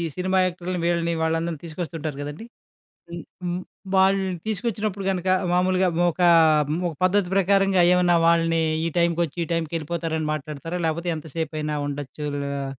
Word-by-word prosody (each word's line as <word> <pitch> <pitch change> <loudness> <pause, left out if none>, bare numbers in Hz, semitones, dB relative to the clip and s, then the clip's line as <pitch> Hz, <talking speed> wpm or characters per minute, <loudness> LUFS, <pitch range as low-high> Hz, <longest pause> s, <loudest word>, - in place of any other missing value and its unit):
Cinema 185 +1 +1
యాక్టర్‌ల్ని 180 0 -3
వీళ్ళని 170 -1 +1
వాళ్ళందరిని 165 -1 -1
తీసుకొస్తుంటారు 160 -3 -5
గదండి! 145 +9 -7 0.7
హ్మ్ 170 0 -6 0.2
హ్మ్ 175 0 -2 0.4
వాళ్ళని 190 0 +3
తీసుకొచ్చినప్పుడు 210 -2 -2
గనక, 185 -1 -3 0.3
మామూలుగా 185 +1 +2 0.2
ఒక 180 - -6 0.7
ఒక 165 - -7
పద్ధతి 185 0 +2
ప్రకారంగా 195 -1 +3
ఏవన్నా 180 -1 +4
వాళ్ళని 165 -1 +3 0.2
ఈ - - +1
టైంకొచ్చి 170 -1 +1
ఈ - - -14
టైంకెళ్ళిపోతారని 160 -1 -2
మాట్లాడతారా? 155 +3 -5
లేకపోతే 170 +2 -1
ఎంతసేపైనా 155 0 -4
ఉండొచ్చు 145 +1 -6 0.4
ఆ - - -3
170 Hz, 125 wpm, -24 LUFS, 160-185 Hz, 0.7 s, ఏవన్నా